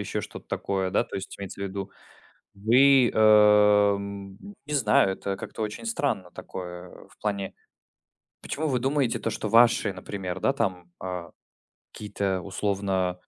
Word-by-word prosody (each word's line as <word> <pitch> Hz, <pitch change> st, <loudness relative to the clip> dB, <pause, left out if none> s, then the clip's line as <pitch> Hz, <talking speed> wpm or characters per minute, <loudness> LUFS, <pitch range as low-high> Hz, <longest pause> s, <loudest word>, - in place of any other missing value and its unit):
еще -, -, -3 dB
что-то -, -, -10 dB
такое, 95 Hz, -1 st, -2 dB
да, 100 Hz, -, +2 dB
то -, -, -12 dB
есть 95 Hz, -, -7 dB
имеется 100 Hz, 0 st, -8 dB
в -, -, -2 dB
виду, 100 Hz, 0 st, -5 dB, 0.6 s
вы, 125 Hz, +5 st, +5 dB
э, 105 Hz, -1 st, +6 dB
м 100 Hz, 0 st, -7 dB, 0.3 s
не 150 Hz, -, -6 dB
знаю, 105 Hz, -6 st, +3 dB
это 100 Hz, 0 st, -4 dB
как-то 105 Hz, -, -9 dB
очень 105 Hz, -, -5 dB
странно, 125 Hz, -, -2 dB
такое 90 Hz, -1 st, -8 dB, 0.2 s
в -, -, -24 dB
плане: 100 Hz, -2 st, -3 dB, 0.9 s
почему 155 Hz, +2 st, -3 dB
вы 130 Hz, -3 st, 0 dB
думаете, 135 Hz, -1 st, 0 dB
то, 115 Hz, -, -2 dB
что 110 Hz, -1 st, -4 dB
ваши, 115 Hz, -3 st, +4 dB
например, 95 Hz, -1 st, -6 dB
да, 135 Hz, -, +1 dB
там, 90 Hz, -8 st, -3 dB
а, 90 Hz, -2 st, -5 dB, 0.6 s
какие-то 100 Hz, -3 st, -3 dB
условно 95 Hz, -2 st, -1 dB
100 Hz, 150 wpm, -26 LUFS, 95-110 Hz, 0.9 s, э